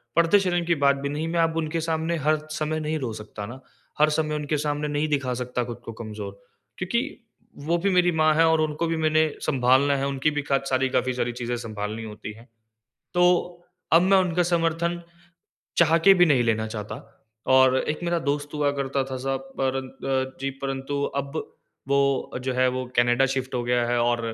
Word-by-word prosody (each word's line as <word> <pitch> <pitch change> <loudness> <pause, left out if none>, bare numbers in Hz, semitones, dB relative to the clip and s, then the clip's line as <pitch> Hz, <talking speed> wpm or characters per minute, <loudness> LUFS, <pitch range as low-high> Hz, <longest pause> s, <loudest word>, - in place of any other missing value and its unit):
पर्दे 170 +5 +5
शर्म 175 -3 0
की 170 0 +2
बात 140 -2 +3
भी 140 0 -4
नहीं 150 +3 -3
मैं 170 +1 -1
अब 165 0 +2
उनके 165 0 -1
सामने 160 +1 -1
हर 155 +1 +2 0.2
समय 155 0 -2
नहीं 155 +1 -2
रो 125 -4 -3
सकता 105 -1 -8
ना। 120 +5 -9 0.4
हर 150 - +5
समय 155 0 0
उनके 150 0 -1
सामने 150 0 -1
नहीं 145 +1 -1
दिखा 140 -4 0
सकता 125 0 -2
ख़ुद 120 -1 -7
को 115 - -5
कमज़ोर। 105 -3 -7 0.5
क्योंकि - - 0 0.6
वो 170 +2 +2
भी 200 - +3
मेरी 180 -1 +3
माँ 155 -1 +3
है 165 +1 +5
और 160 -1 +3
उनको 155 +2 -1
भी 165 0 -1
मैंने 155 0 +2
सँभालना 135 +1 +3
है 135 0 -1
उनकी 140 +2 0
भी 145 0 -1
काच 135 0 +1
सारी 130 0 +1
काफ़ी 130 0 0
सारी 120 -1 -1
चीज़ें 120 0 -3
सँभालनी 110 -1 -5
होती 105 0 -7
है। 115 +3 -16 0.7
तो 175 - +3 0.7
अब 165 - +7
मैं 190 +1 +4
उनका 180 -1 +2
समर्थन 170 0 0 0.8
चाह 165 -1 +5
के 195 - +9
भी 175 -1 +5
नहीं 135 -5 +4
लेना 110 -1 0
चाहता। 105 -1 -6 0.6
और 130 0 +6
एक 155 - -2
मेरा 170 0 +1
दोस्त 145 0 -1
हुआ 145 -1 +1
करता 140 -1 -1
था 130 - -3
साहब 135 0 -3
परं 135 0 -1
अ, 130 0 -3
जी 135 0 -1
परंतु 135 +1 -3 0.2
अब 140 +3 -9 0.5
वो 140 -2 +1
जो 130 0 -1
है 130 0 +3
वो 130 - -2
कनाडा 120 +2 +4
शिफ़्ट 130 -1 -3
हो 120 - 0
गया 120 -1 +1
है 120 - +1
और 120 0 +1
140 Hz, 200 wpm, -25 LUFS, 130-160 Hz, 0.8 s, के